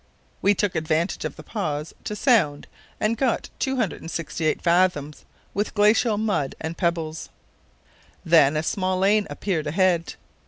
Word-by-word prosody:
We 205 +1 +4
took 205 -1 0
advantage 160 +2 -1
of - - -4
the - - -11
pause 155 -8 -4
to 210 - -3
sound 190 - +2 0.3
and 215 +2 +1
got 255 -1 0
268 170 - -2
fathoms 170 -4 +1 0.3
with 205 +2 -2
glacial 210 +1 +4
mud 205 -10 -1
and 160 +1 -4
pebbles. 165 -3 -2 1.0
Then 155 -3 +5
a 155 - 0
small 185 +2 -1
lane 205 +2 +3
appeared 165 -7 -2
ahead. 175 +1 +1
175 Hz, 130 wpm, -24 LUFS, 160-205 Hz, 1.0 s, Then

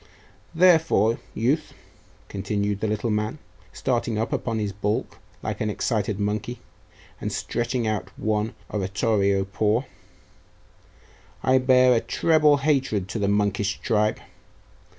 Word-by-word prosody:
Therefore, 160 - +4 0.2
youth,' 140 +8 0 0.5
continued 100 0 -2
the 110 - -1
little 110 +2 -1
man, 105 +5 -1 0.3
starting 120 -3 -1
up 110 +1 -1
upon 115 -2 -1
his 105 -2 -2
baulk 105 +2 -2 0.2
like - - -4
an 110 - 0
excited 105 -1 -1
monkey, 105 +4 -2 0.6
and - - -3
stretching 120 0 -2
out 105 -4 -2
one 110 +1 -1 0.2
oratorio 100 0 +1
paw, 105 +4 +1 1.6
'I 130 0 +4
bear 130 0 +5
a 115 - +2
treble 150 -3 +3
hatred 130 -10 +1
to 115 - -3
the 100 - +1
monkish 100 0 +1
tribe. 105 -2 +1
110 Hz, 120 wpm, -24 LUFS, 105-125 Hz, 1.6 s, bear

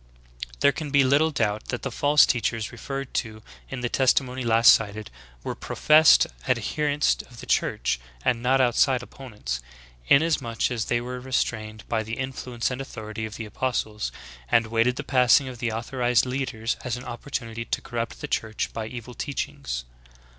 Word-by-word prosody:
"'' - - -10
18. - - -22
There 140 - +6
can 150 +2 -5
be 140 0 +4
little 140 +4 +4
doubt 110 -8 -1
that 120 - -4
the 135 - -3
false 145 +5 +5
teachers 115 -2 -1
re 120 - -11
ferred 135 +2 -5
to 110 -2 -3 0.3
in 130 -2 -5
the 120 - 0
testim.ony 130 0 +2
last 115 0 +7
cited, 105 - 0 0.3
were - - -3
professed 155 0 +5 0.2
adher 150 -1 0
ents 145 +1 +2
of 120 -2 -14
the - - -8
Church, - - 0 0.3
and 115 -2 +2
not 130 +2 +3
outside 130 +1 +3
opponents, 110 - -6 0.5
inasmuch 140 -7 +2
as 115 -3 -1
they 120 - +1
were 125 +1 -5
restrained 110 -4 -2
by 115 -1 0
the 110 +1 -5
influence 130 -2 -3
and 125 +1 -4
authority 110 -4 -6
of 105 - -10
the 115 - -5
apostles, 110 -2 -2 0.4
and 115 0 +4
waited 115 +2 +3
the - - -4
passing 130 0 +4
of 125 -2 -8
the 120 -2 -1
authorized 120 +2 +1
leaders 125 -3 -2
as 125 -1 -2
an 125 - -8
opportunity 120 -2 -5
to - - -2
corrupt 115 -1 -5
the - - -4
Church 110 -1 -2
by 110 -1 -4
evil 125 +1 -8
teachings. - - -4
120 Hz, 180 wpm, -25 LUFS, 110-130 Hz, 0.5 s, last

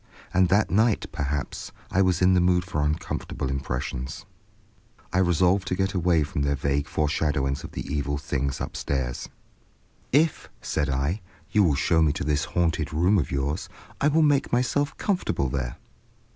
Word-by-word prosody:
And 95 -1 +4
that 100 -2 +3
night, 110 +3 +3
perhaps, 70 0 -3 0.2
I 95 - +3
was 90 -2 +2
in 95 +1 +5
the 90 - +4
mood 90 0 +3
for 90 -5 -2
uncomfortable 75 -3 -2
impressions. 65 -1 -4 0.9
I 95 - +3
resolved 90 +2 +3
to 90 - 0
get 95 +1 0
away 85 -3 +2
from 70 -1 -3
their 70 0 +1
vague 70 +2 -1
fore 75 - 0
shadowings 75 -3 0
of - - -9
the - - -5
evil 70 0 -2
things 70 -1 -2
upstairs. 65 -3 -3 0.8
"If," 155 +4 +2
said 70 - -1
I, 70 +9 -1 0.3
"you 105 - +4
will 80 -6 +3
show 80 +4 +2
me 75 -3 +3
to - - -3
this 75 +1 0
haunted 85 -1 0
room 90 +6 +3
of 75 - -2
yours, 70 +3 -2 0.3
I 145 - +4
will 155 +2 +4
make 145 -2 +2
myself 140 +4 +1
comfortable 180 - 0
there." 65 -2 -3
80 Hz, 170 wpm, -26 LUFS, 70-95 Hz, 0.9 s, in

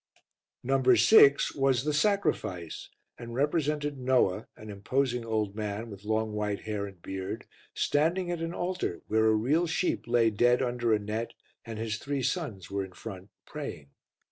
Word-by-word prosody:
No. 135 +1 +1
6 140 - +6
was 135 -3 +2
The 150 0 0
Sacrifice 150 - -1 0.3
and 120 -1 -7
represented 145 0 0
Noah, 125 -6 +2
an 110 0 -9
imposing 125 +4 -1
old 110 -3 -1
man 105 +1 -4
with 100 0 -11
long 110 0 0
white 105 -1 -2
hair 105 -2 -3
and 95 -3 -13
beard, 95 -1 -5 0.3
standing 175 +5 +1
at 170 -2 -3
an 165 0 -2
altar 175 - -3
where 110 +1 +3
a 110 - +4
real 145 +11 +2
sheep 165 -2 -1
lay 115 -1 +3
dead 120 +4 +3
under 120 -2 0
a 110 - +5
net 105 +3 -4 0.3
and 115 -2 -7
his 110 -1 -2
three 140 0 -3
sons 120 - -3
were 100 0 -1
in 95 -1 -10
front 95 -1 -9 0.2
praying. 70 -2 -7
115 Hz, 165 wpm, -29 LUFS, 105-140 Hz, 0.3 s, 6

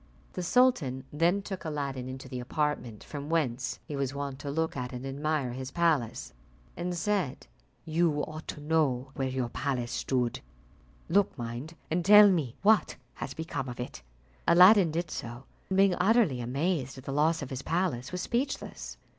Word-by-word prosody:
The 185 - -3
sultan 175 - +2
then 175 +6 +2
took 190 -2 -6
Aladdin 140 -5 -3
into 130 0 -7
the 125 - -5
apartment 125 -4 -2
from 145 0 -7
whence 130 -6 0
he 150 - -5
was 140 0 -2
wont 140 -1 -4
to 145 - -5
look 160 +3 -1
at 125 -2 -4
and 125 +1 -6
admire 140 -1 -1
his 130 +1 -5
palace, 155 -7 0 0.4
and 175 0 -3
said, 185 -8 -1 0.4
"You 160 -2 +1
ought 155 0 -7
to - - -5
know 145 -4 +1
where 135 -1 -2
your 130 -2 -2
palace 125 -3 -2
stood; 125 -3 -1 0.7
look, 195 +1 +2
mind, 120 +7 -6 0.2
and 170 +2 +1
tell 210 +2 +9
me 145 -10 -1
what 215 +1 +4 0.2
has - - -6
become 145 -5 -4
of 120 - -8
it." 125 - -6 0.5
Aladdin 185 +1 +7
did 165 0 -3
so, 120 +2 -6 0.3
and 190 - 0
being 195 -1 +5
utterly 185 - +3
amazed 135 +2 -1
at 130 - -10
the 135 - -4
loss 155 +2 +2
of 135 - -8
his 130 0 -4
palace, 160 -7 -1
was 180 0 -3
speechless. 250 +4 -3
150 Hz, 170 wpm, -29 LUFS, 130-175 Hz, 0.7 s, tell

